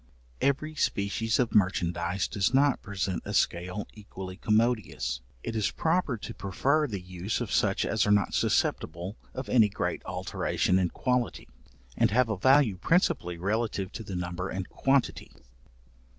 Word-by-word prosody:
Every 150 +3 +1
species 110 -4 0
of 125 -3 0
merchandize 90 -2 +1
does 105 +3 0
not 140 0 +3
present 95 -2 -3
a - - -4
scale 90 +4 0
equally 95 -3 -8
commodious. 105 - 0 0.2
It 115 - -4
is 110 -2 +1
proper 160 -6 0
to 115 +2 -7
prefer 135 - +1
the 105 -6 -4
use 90 +3 -4
of 120 -5 -4
such 95 -2 +2
as 105 -2 +1
are - - +3
not 105 -1 +3
susceptible 85 +6 0 0.2
of 130 0 -5
any 110 -4 +5
great - - -2
alteration 95 +1 0
in 90 -2 +1
quality, 125 -7 -1 0.5
and - - +3
have 120 +2 +2
a 110 - -1
value 130 -4 +4
principally 140 - +1
relative 100 0 -1
to - - -6
the 100 -3 -6
number 90 +1 -3
and 95 0 -4
quantity. 135 -1 0
105 Hz, 150 wpm, -28 LUFS, 90-125 Hz, 0.5 s, any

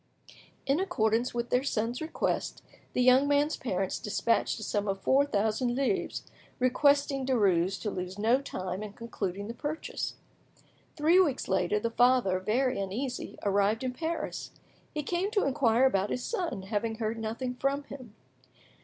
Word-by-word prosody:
In 275 +4 +2
accordance 230 - +1
with 235 0 -3
their 250 - +3
son's 235 -1 -1
request, 315 - -2 0.3
the 250 - +2
young 255 +3 +6
man's 290 +2 +2
parents 195 -6 -2
despatched 220 +3 0
a - - -6
sum 205 0 -1
of 195 0 -1
four 275 +7 +3
thousand 220 +2 0
livres, 255 -7 -1 0.3
requesting 280 +2 +3
Derues 195 -7 +2
to 210 - -1
lose 185 0 -5
no 230 +6 +3
time 185 -7 -4
in 210 -1 -6
concluding 205 -4 -4
the 230 - -5
purchase. 295 +5 -4 0.8
Three 325 +4 +4
weeks 295 -8 +2
later, 190 +2 +1
the 230 +2 -2
father, 245 -6 +3
very 250 +5 0
uneasy, 220 +7 -4
arrived 205 +3 +2
in 255 -1 -2
Paris. 320 +2 -3 0.4
He 300 -1 -3
came 355 +6 -1
to 425 -2 +1
inquire 260 -3 +3
about 200 -5 +2
his 250 - -2
son, 355 - -2
having 220 +3 -2
heard 220 0 -2
nothing 230 +3 -3
from 275 +3 -1
him. 255 -6 -11
240 Hz, 155 wpm, -29 LUFS, 205-275 Hz, 0.8 s, young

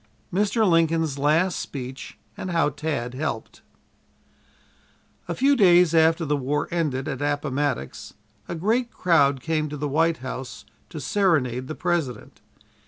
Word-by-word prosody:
MR. 210 +3 +2
LINCOLN'S 165 -4 +2
LAST 160 +6 +2
SPEECH 130 -1 -7 0.2
AND 185 - -6
HOW 165 -3 +2
TAD 145 -5 -3
HELPED 150 +5 -4 1.7
A - - -3
few 280 +2 +3
days 180 - +5
after 165 +1 +3
the 150 0 +1
war 145 +2 -1
ended 150 -6 -1
at 135 - -4
Appomattox, 145 - -2 0.3
a - - -4
great 225 +8 0
crowd 140 -7 +2
came 155 0 -1
to 150 - -6
the 145 +1 -2
White 160 +3 +2
House 130 0 -7 0.2
to 160 - -7
serenade 130 - +1
the 155 - -5
President. 165 -10 -3
155 Hz, 135 wpm, -24 LUFS, 140-170 Hz, 1.7 s, days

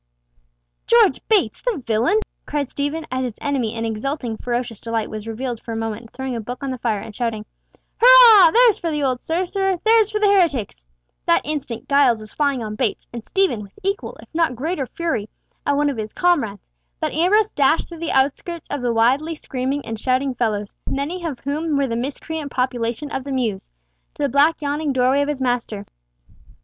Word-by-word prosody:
"George 465 -4 +4
Bates, 430 -3 +2
the - - -1
villain!" 235 - +2 0.3
cried 290 -3 -2
Stephen, 290 +3 -3
as 260 0 -1
his 245 -4 -3
enemy 255 -6 -1
in 225 0 -2
exulting 230 +2 -3
ferocious 240 -1 -3
delight 230 -1 -3
was 215 0 -6
revealed 235 +1 -4
for 230 - -6
a - - -3
moment 225 0 -4
throwing 265 0 -5
a 230 - -3
book 245 +5 -7
on 275 - -2
the 255 - -5
fire, 225 -3 0
and 210 +1 -9
shouting, 225 -2 -2 0.6
"Hurrah! 470 -7 +9
there's 470 +2 +5
for 335 - -2
the 300 -2 -1
old 255 -2 0
sorcerer, 370 +2 -1
there's 445 -1 +5
for 430 - -2
the 425 - +2
heretics!" 330 - +2 0.4
That - - +4
instant 280 -6 -4
Giles 280 -5 +4
was 215 0 -9
flying 280 -5 0
on 215 -1 -5
Bates, 215 0 -2
and 235 -2 -6
Stephen, 380 - +1
with 200 -1 -12
equal, 395 +4 -3
if - - -14
not 325 -5 +1
greater 285 +1 -2
fury, 235 -12 -3 0.4
at 285 0 +2
one 295 0 +2
of 265 - -7
his 215 -1 -5
comrades; 280 - +1 0.3
but - - -2
Ambrose 390 +7 +3
dashed 285 +3 +2
through 335 -2 -10
the 335 - -2
outskirts 285 +5 0
of 290 - -3
the 245 -1 0
wildly 265 +8 +2
screaming 270 -1 -3
and 225 -1 -5
shouting 260 +2 0
fellows, 215 -4 -2 0.2
many 315 +6 -3
of 300 -7 -4
whom 295 +2 -1
were 280 - +2
the 230 -3 -2
miscreant 290 +4 -4
population 250 +2 -2
of 265 - -3
the 280 - -6
mews, 230 -7 -2 0.5
to - - -3
the 285 - +2
black 295 +4 +3
yawning 290 0 -1
doorway 260 +2 +3
of 285 - -1
his 275 -3 -2
master. 235 -5 -2
270 Hz, 195 wpm, -21 LUFS, 230-320 Hz, 0.6 s, Hurrah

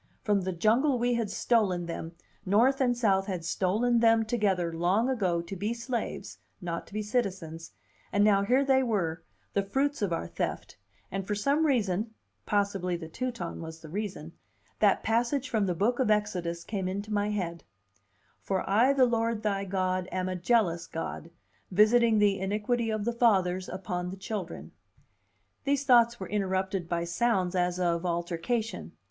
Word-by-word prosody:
From 205 -2 +2
the 185 +1 -2
jungle 235 - +2
we 245 +1 +1
had 230 -3 -1
stolen 200 -5 +1
them, 165 0 -6 0.3
North 240 +8 +3
and 245 -2 +2
South 195 -4 +2
had 180 -4 -4
stolen 220 +8 +1
them 225 -1 +4
together, 195 -7 0
long 180 +8 +2
ago, 190 -10 0
to 185 +3 -7
be 210 +5 -2
slaves, 235 0 -4 0.2
not 170 -2 -4
to - - -16
be 215 - -1
citizens, 190 -8 -3 0.4
and 205 - +3
now 205 -2 +5
here 255 +7 +2
they 265 -1 +4
were, 190 -10 -1 0.3
the 200 - +2
fruits 270 +8 -1
of 200 -4 0
our 125 - -1
theft; - - -4 0.4
and 195 0 -4
for 210 - -1
some 280 +9 +2
reason 220 -4 0 0.3
(possibly 200 -4 0
the 165 -2 -8
Teuton 230 -2 -4
was 160 0 -8
the 160 - -10
reason) 185 -4 -5 0.5
that 205 -2 +3
passage 240 +5 +1
from 215 -4 0
the 180 - 0
Book 230 +8 +1
of 255 - +2
Exodus 180 -5 0
came 195 -2 -3
into 200 +3 -4
my 205 0 +1
head: 175 -5 -3 0.8
"For 190 -2 -2
I 230 +8 +4
the 265 -2 +5
Lord 230 -2 0
thy 200 -2 0
God 185 -1 -1
am 185 0 -2
a 185 - -2
jealous 180 -3 +1
God, 165 0 -5 0.4
visiting 220 +3 +4
the 205 -2 +3
iniquity 210 +4 -1
of 215 -1 -2
the 235 - 0
fathers 190 -6 +2
upon 180 -2 -4
the 190 - -7
children." 190 -2 -6 0.9
These 280 0 +1
thoughts 235 -3 +5
were 190 - -5
interrupted 190 -2 -1
by 170 -1 0
sounds 185 +1 0
as 180 0 0
of 170 -1 +1
altercation. 175 - -2
200 Hz, 170 wpm, -29 LUFS, 180-230 Hz, 0.9 s, now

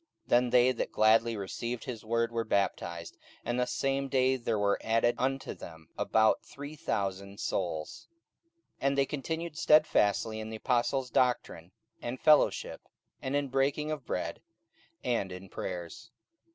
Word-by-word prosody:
44:002:041 - - -30
Then 120 +1 +4
they 125 +1 +5
that 125 - -3
gladly 110 +1 +4
received 115 +4 -4
his 120 -4 -6
word 115 +1 0
were 115 0 -1
baptized: 85 -5 -2 0.3
and 120 +1 -1
the 125 - +1
same 135 +1 0
day 130 -1 +3
there 115 -3 -1
were 100 -1 +1
added 115 +1 +3
unto 135 +1 -1
them 80 -2 -12
about 110 0 +3
three 145 +2 -9
thousand 100 -5 -3
souls. 80 -5 -3 0.7
44:002:042 140 - +1
And 140 0 +1
they 140 - +4
continued 160 +3 -4
stedfastly 110 -7 +3
in 110 0 -5
the 110 - -5
apostles' 125 +2 0
doctrine 110 -9 0 0.3
and 120 +2 -4
fellowship, 155 -1 +3 0.4
and 130 +1 -2
in 145 -1 0
breaking 140 +3 0
of 150 -4 -4
bread, 85 -2 -3 0.6
and 115 -6 0
in 90 +1 -9
prayers. 90 +7 -6
120 Hz, 150 wpm, -30 LUFS, 100-135 Hz, 0.7 s, they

